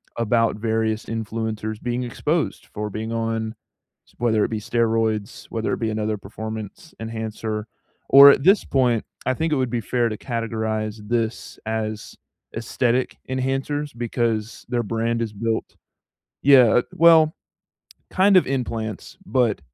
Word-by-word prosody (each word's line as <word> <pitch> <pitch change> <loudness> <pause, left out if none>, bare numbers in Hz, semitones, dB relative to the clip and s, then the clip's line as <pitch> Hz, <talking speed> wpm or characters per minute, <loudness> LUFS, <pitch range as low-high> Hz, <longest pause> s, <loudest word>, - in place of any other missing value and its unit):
about 115 -1 +1
various 110 0 -1
influencers 110 -1 -4
being 125 0 -2
exposed 150 +6 -2
for 105 0 -5
being 110 +2 -5
on 115 -1 -2 0.5
s - - -25
whether 110 -3 +2
it - - -1
be 110 - -2
steroids, 115 -1 -1
whether 115 -1 -2
it - - -6
be 110 -1 0
another 110 0 -1
performance 110 - -8
enhancer 110 -1 -4 0.4
or, 140 +1 +10
at 135 - +3
this 195 +6 +5
point, 125 -4 +1 0.2
I 130 - +2
think 160 +4 -1
it - - +3
would 130 -2 0
be 120 - -1
fair 120 +2 0
to 110 - -4
categorize 110 -3 -3
this 115 0 -2
as 110 -1 -4 0.4
aesthetic 120 +2 0
enhancers 135 +2 -2
because 115 -2 -2
their 120 -1 0
brand 115 +1 -1
is 110 -2 -3
built 110 +2 -3 0.7
Yeah, 130 -4 +6
eh, - - +1
well, 160 -1 +6 0.8
kind 195 +1 +4
of 185 - +5
implants, 115 0 -4
but 125 - +1
115 Hz, 145 wpm, -23 LUFS, 110-125 Hz, 0.8 s, or